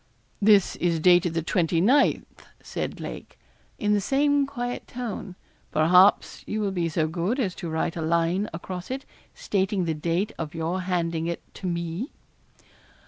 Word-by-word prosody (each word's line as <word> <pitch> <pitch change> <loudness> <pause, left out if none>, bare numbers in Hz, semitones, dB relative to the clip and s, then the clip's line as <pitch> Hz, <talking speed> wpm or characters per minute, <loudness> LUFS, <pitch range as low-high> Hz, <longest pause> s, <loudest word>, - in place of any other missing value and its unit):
'This 205 -2 +5
is 170 -2 +1
dated 175 0 +4
the 165 - 0
29th,' 180 - +3 0.4
said - - -4
Lake, - - -8 0.4
in 210 0 +1
the 205 - +2
same 285 +4 +2
quiet 245 -3 -4
tone; 230 -6 -6 0.4
'perhaps 180 +5 +4
you 215 - -2
will 205 -2 0
be 175 -3 -1
so 155 -1 0
good 175 - -1
as 195 -8 0
to 170 - -6
write 160 +1 -1
a 165 - -3
line 170 +5 +1
across 180 +2 -6
it, 265 +1 -4 0.3
stating 195 -2 0
the 165 - 0
date 170 +7 -1
of 160 0 -5
your 165 +3 -2
handing 170 -3 -1
it 170 - -4
to 190 - -6
me.' 170 - -3
180 Hz, 155 wpm, -25 LUFS, 165-210 Hz, 0.4 s, This